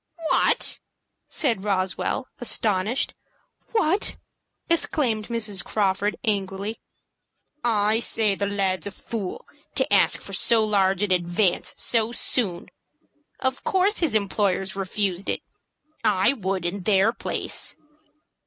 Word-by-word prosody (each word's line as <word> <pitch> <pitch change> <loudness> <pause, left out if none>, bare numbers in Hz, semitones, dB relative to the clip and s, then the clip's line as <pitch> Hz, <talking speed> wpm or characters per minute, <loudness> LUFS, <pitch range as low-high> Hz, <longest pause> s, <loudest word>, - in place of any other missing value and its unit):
"What!" - - +2 0.5
said 230 -10 0
Roswell, 195 +5 -1
astonished. 220 0 +1 0.6
"WHAT!" 395 -3 +2 0.5
exclaimed 250 -10 +1
Mrs. 215 -5 -2
Crawford, 205 0 0
angrily. 200 -1 -2 0.8
"I 215 -1 +2
say 220 -3 +1
the 200 +1 -1
lad's 195 -3 -1
a - - -4
fool 205 -2 -5 0.3
to - - +1
ask - - +4
for - - -9
so 225 -2 +4
large 195 -2 +2
an 205 - 0
advance 175 +1 +1
so 230 -1 +1
soon. 205 -7 -1 0.7
Of 260 0 -1
course 385 +2 +2
his 320 -10 +1
employers 195 -2 +1
refused 195 -1 -1
it. - - -1 0.6
I 210 +2 +3
would, 190 -7 -2
in 190 +3 -2
their 200 +3 +3
place." - - -3
205 Hz, 115 wpm, -24 LUFS, 190-230 Hz, 0.8 s, ask